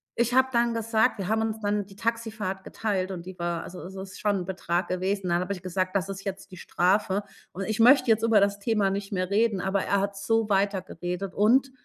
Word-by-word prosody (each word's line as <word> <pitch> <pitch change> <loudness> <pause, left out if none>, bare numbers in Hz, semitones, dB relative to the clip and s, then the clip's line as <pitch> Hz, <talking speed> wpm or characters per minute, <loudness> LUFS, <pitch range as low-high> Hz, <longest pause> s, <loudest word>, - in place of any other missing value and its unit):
ich 235 +1 +1
habe 260 0 +5
dann 235 0 +2
gesagt 225 +1 +1
wir 190 - -3
haben 220 0 +2
uns 220 0 -2
dann 205 -1 0
die 195 - -15
Taxifahrt 225 -4 -3
geteilt 195 -4 -2
und 175 -2 -6
die 185 0 -9
war 170 -1 -2
also, 180 - -9
es 190 +2 -9
ist 190 -1 -8
schon 205 -2 +1
'n - - -10
Betrag 180 -1 -2
gewesen, 185 +1 -1
dann 170 0 +2
habe 185 +2 -3
ich 180 - -8
gesagt: 185 +1 -2
„Das 195 -1 +1
ist 195 0 -6
jetzt 195 0 -6
die 185 - -10
Strafe, 190 +3 +1 0.3
und 195 - -4
ich 215 0 -2
möchte 255 +1 +6
jetzt 225 0 +2
über 225 -2 +5
das 200 0 +1
Thema 210 -2 +1
nicht 200 0 -4
mehr 185 -1 -1
reden“, 215 -2 +2
aber 190 +1 0
er 200 - +1
hat 200 0 -2
so 225 +2 +1
weiter 195 -1 +2
geredet, 180 +1 -5
und 255 +6 +4
200 Hz, 240 wpm, -26 LUFS, 185-220 Hz, 0.3 s, möchte